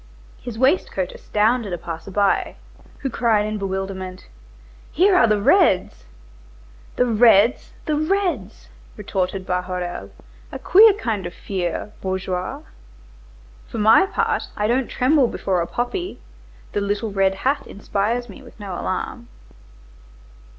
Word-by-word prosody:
His 240 Hz, -3 st, -7 dB
waistcoat 260 Hz, -, +1 dB
astounded 215 Hz, -1 st, 0 dB
a -, -, -2 dB
passer 165 Hz, +2 st, -7 dB
by, 200 Hz, 0 st, +1 dB, 0.5 s
who 270 Hz, -, -2 dB
cried 220 Hz, -3 st, +2 dB
in 215 Hz, 0 st, -3 dB
bewilderment:— 190 Hz, -1 st, -5 dB, 0.6 s
"Here 375 Hz, +4 st, +4 dB
are 240 Hz, -, +5 dB
the 210 Hz, -1 st, +2 dB
reds!" 195 Hz, -, +3 dB, 0.9 s
"The 250 Hz, -, +2 dB
reds, 230 Hz, -1 st, +4 dB
the 305 Hz, -, 0 dB
reds!" 310 Hz, -, -1 dB, 0.3 s
retorted 190 Hz, -2 st, -2 dB
Bahorel. 180 Hz, -, -3 dB, 0.4 s
"A -, -, -5 dB
queer 425 Hz, +3 st, +6 dB
kind 220 Hz, -, -3 dB
of 175 Hz, -, -10 dB
fear, 185 Hz, +1 st, -4 dB
bourgeois. 185 Hz, -1 st, -3 dB, 1.1 s
For -, -, -7 dB
my 220 Hz, -, +5 dB
part -, -, -1 dB
I 210 Hz, -, 0 dB
don't 245 Hz, +3 st, +1 dB
tremble 265 Hz, 0 st, +3 dB
before 185 Hz, -5 st, -1 dB
a 170 Hz, -, -2 dB
poppy, 350 Hz, -, -3 dB, 0.5 s
the 205 Hz, -, -1 dB
little 205 Hz, +2 st, -2 dB
red 195 Hz, -1 st, +2 dB
hat 270 Hz, +8 st, -1 dB
inspires 210 Hz, +4 st, -2 dB
me 215 Hz, +5 st, -12 dB
with 245 Hz, -3 st, -16 dB
no 200 Hz, -3 st, -6 dB
alarm. -, -, -4 dB
210 Hz, 130 wpm, -21 LUFS, 190-250 Hz, 1.1 s, queer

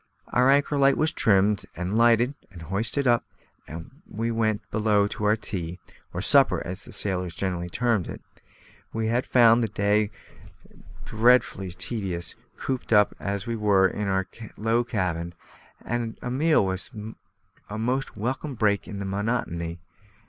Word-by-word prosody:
Our 125 Hz, +2 st, +3 dB
anchor 145 Hz, +1 st, +3 dB
light 135 Hz, 0 st, +4 dB
was 155 Hz, +1 st, +2 dB
trimmed 100 Hz, 0 st, +3 dB
and 90 Hz, +5 st, -3 dB
lighted 120 Hz, +3 st, +4 dB, 0.2 s
and 85 Hz, -3 st, -11 dB
hoisted 110 Hz, -, -1 dB
up, 120 Hz, -1 st, +3 dB, 0.4 s
and 85 Hz, -, -10 dB
we 115 Hz, +2 st, -2 dB
went 110 Hz, -2 st, 0 dB
below 105 Hz, -2 st, +2 dB
to 105 Hz, -, -4 dB
our 105 Hz, +1 st, +4 dB
tea, 90 Hz, -5 st, -5 dB, 0.3 s
or -, -, -4 dB
supper, -, -, +4 dB
as 90 Hz, +3 st, -4 dB
sailors 90 Hz, -3 st, -1 dB
generally 90 Hz, -2 st, -2 dB
term 115 Hz, -2 st, 0 dB
it. -, -, -7 dB, 0.7 s
We 115 Hz, 0 st, -1 dB
had 120 Hz, +2 st, 0 dB
found 120 Hz, -1 st, +6 dB
the 115 Hz, -, +1 dB
day 105 Hz, 0 st, +1 dB, 1.0 s
dreadfully 110 Hz, -4 st, +2 dB
tedious, 90 Hz, -1 st, -3 dB, 0.2 s
cooped 130 Hz, -3 st, -4 dB
up 105 Hz, -2 st, +5 dB
as 100 Hz, -1 st, -3 dB
we 115 Hz, -, -2 dB
were 100 Hz, -3 st, +4 dB
in 105 Hz, +2 st, -3 dB
our 95 Hz, -1 st, +1 dB, 0.3 s
low 115 Hz, +2 st, +1 dB
cabin, 90 Hz, -7 st, -2 dB, 0.5 s
and 120 Hz, -1 st, -3 dB
a 125 Hz, -, -5 dB
meal 150 Hz, -3 st, +3 dB
was 95 Hz, 0 st, -2 dB, 0.8 s
a 105 Hz, -, -5 dB
most 125 Hz, +2 st, -2 dB
welcome 130 Hz, +6 st, -3 dB
break 105 Hz, -3 st, +1 dB
in 100 Hz, -, -6 dB
the 100 Hz, -, -4 dB
monotony. 95 Hz, -5 st, -2 dB
105 Hz, 150 wpm, -25 LUFS, 95-120 Hz, 1.0 s, found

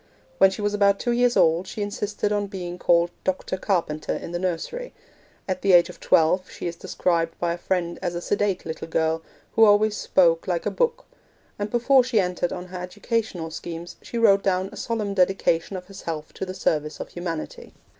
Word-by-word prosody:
When 195 Hz, -, +7 dB
she 200 Hz, +2 st, -5 dB
was 205 Hz, 0 st, 0 dB
about 200 Hz, -1 st, +4 dB
two 240 Hz, -, 0 dB
years 245 Hz, 0 st, +3 dB
old 165 Hz, +3 st, +3 dB
she 210 Hz, -, -4 dB
insisted 205 Hz, 0 st, -2 dB
on 205 Hz, -1 st, 0 dB
being 180 Hz, -3 st, -6 dB
called 170 Hz, 0 st, +3 dB
'Doctor 185 Hz, 0 st, -1 dB
Carpenter' 170 Hz, -6 st, -1 dB
in -, -, -7 dB
the 175 Hz, -, -2 dB
nursery; 185 Hz, -, -3 dB, 0.5 s
at 185 Hz, -1 st, -2 dB
the 195 Hz, -2 st, +3 dB
age 175 Hz, 0 st, +6 dB
of 180 Hz, -, -11 dB
twelve 180 Hz, +3 st, +3 dB
she -, -, -8 dB
is 170 Hz, -1 st, -3 dB
described 165 Hz, -1 st, -1 dB
by 170 Hz, -1 st, 0 dB
a -, -, -5 dB
friend 175 Hz, -2 st, -1 dB
as 175 Hz, -2 st, -2 dB
a -, -, -1 dB
sedate 200 Hz, 0 st, -1 dB
little 160 Hz, 0 st, -5 dB
girl, 160 Hz, 0 st, 0 dB, 0.3 s
who 225 Hz, -, +5 dB
always 210 Hz, 0 st, +5 dB
spoke 170 Hz, -4 st, +3 dB
like 175 Hz, -2 st, -1 dB
a -, -, 0 dB
book; 480 Hz, -1 st, 0 dB, 0.5 s
and 205 Hz, +1 st, -2 dB
before 250 Hz, +3 st, +4 dB
she 240 Hz, -3 st, +1 dB
entered 180 Hz, -2 st, 0 dB
on 180 Hz, -, -5 dB
her 180 Hz, 0 st, -6 dB
educational 185 Hz, -3 st, -3 dB
schemes 170 Hz, +1 st, -7 dB
she 235 Hz, -, -6 dB
wrote 200 Hz, -4 st, +5 dB
down 190 Hz, -1 st, 0 dB
a -, -, -10 dB
solemn 215 Hz, -3 st, -2 dB
dedication 185 Hz, -1 st, +1 dB
of 180 Hz, -, -8 dB
herself 165 Hz, -5 st, -6 dB
to 190 Hz, -, -5 dB
the 185 Hz, -, -5 dB
service 150 Hz, -4 st, -1 dB
of -, -, -6 dB
humanity. 170 Hz, -3 st, -6 dB
185 Hz, 200 wpm, -24 LUFS, 170-205 Hz, 0.5 s, When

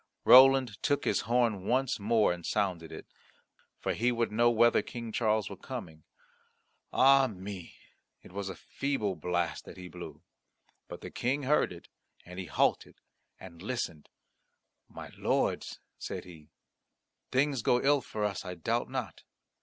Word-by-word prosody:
Roland 130 Hz, -4 st, +7 dB
took 145 Hz, -, 0 dB
his 100 Hz, -, +1 dB
horn 115 Hz, -6 st, +1 dB
once 130 Hz, 0 st, +1 dB
more 105 Hz, -2 st, +3 dB
and 85 Hz, -1 st, -9 dB
sounded 90 Hz, -6 st, -1 dB
it, -, -, -9 dB, 0.7 s
for -, -, -2 dB
he 120 Hz, +3 st, +1 dB
would 115 Hz, -2 st, -1 dB
know 120 Hz, +2 st, +4 dB
whether 120 Hz, 0 st, +4 dB
King 115 Hz, -2 st, -7 dB
Charles 110 Hz, -2 st, +1 dB
were 100 Hz, -, -7 dB
coming. 90 Hz, -, -8 dB, 0.9 s
Ah 135 Hz, 0 st, +5 dB
me! 95 Hz, -3 st, -8 dB, 0.5 s
it -, -, -14 dB
was 100 Hz, 0 st, -4 dB
a 95 Hz, -, -6 dB
feeble 125 Hz, -9 st, -2 dB
blast 85 Hz, -2 st, -2 dB
that -, -, -11 dB
he 90 Hz, 0 st, -8 dB
blew. 80 Hz, -4 st, -10 dB, 0.6 s
But -, -, -9 dB
the -, -, -8 dB
King 135 Hz, +4 st, -1 dB
heard 150 Hz, +3 st, +2 dB
it, 85 Hz, -, -11 dB, 0.4 s
and 90 Hz, +1 st, -9 dB
he 95 Hz, -, -4 dB
halted -, -, 0 dB, 0.4 s
and 85 Hz, -3 st, -12 dB
listened. 95 Hz, -, -4 dB, 0.8 s
"My -, -, -9 dB
lords!" -, -, 0 dB, 0.2 s
said -, -, -5 dB
he, 80 Hz, -4 st, -14 dB, 0.8 s
"things 135 Hz, -1 st, +1 dB
go 125 Hz, +2 st, +3 dB
ill 140 Hz, +1 st, +3 dB
for 110 Hz, -3 st, -5 dB
us, 100 Hz, -3 st, -3 dB
I 90 Hz, -, -6 dB
doubt 115 Hz, +8 st, -1 dB
not. 130 Hz, -3 st, -5 dB
110 Hz, 155 wpm, -30 LUFS, 90-125 Hz, 0.9 s, Roland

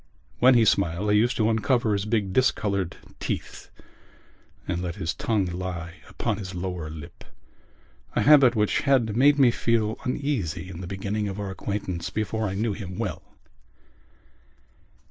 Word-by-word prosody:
When 130 Hz, +1 st, +6 dB
he 115 Hz, -2 st, +5 dB
smiled 100 Hz, 0 st, +1 dB
he 105 Hz, -, +5 dB
used 120 Hz, +3 st, +1 dB
to 110 Hz, -, +2 dB
uncover 115 Hz, 0 st, +1 dB
his 100 Hz, 0 st, -1 dB
big 105 Hz, -4 st, 0 dB
discoloured 100 Hz, -7 st, +1 dB, 0.2 s
teeth -, -, -5 dB, 1.0 s
and 90 Hz, -1 st, -2 dB
let 90 Hz, -2 st, -4 dB
his 85 Hz, -5 st, -2 dB
tongue 105 Hz, -4 st, 0 dB
lie 90 Hz, -1 st, -5 dB
upon 110 Hz, -3 st, -2 dB
his 95 Hz, -2 st, -6 dB
lower 90 Hz, -3 st, -4 dB
lip—a 75 Hz, -5 st, -10 dB
habit 140 Hz, -5 st, +7 dB
which 105 Hz, -1 st, +2 dB
had 130 Hz, -7 st, +2 dB
made 140 Hz, +4 st, +5 dB
me 130 Hz, -4 st, +6 dB
feel 115 Hz, -2 st, 0 dB
uneasy 105 Hz, -, -2 dB
in 90 Hz, -1 st, -8 dB
the 90 Hz, -, -6 dB
beginning 100 Hz, +2 st, -3 dB
of 100 Hz, 0 st, -5 dB
our 100 Hz, -1 st, -4 dB
acquaintance 95 Hz, -3 st, -4 dB
before 110 Hz, +1 st, -2 dB
I 95 Hz, -, -4 dB
knew 110 Hz, +1 st, 0 dB
him 95 Hz, -3 st, -7 dB
well. 110 Hz, -5 st, -3 dB
105 Hz, 150 wpm, -25 LUFS, 90-115 Hz, 1.0 s, habit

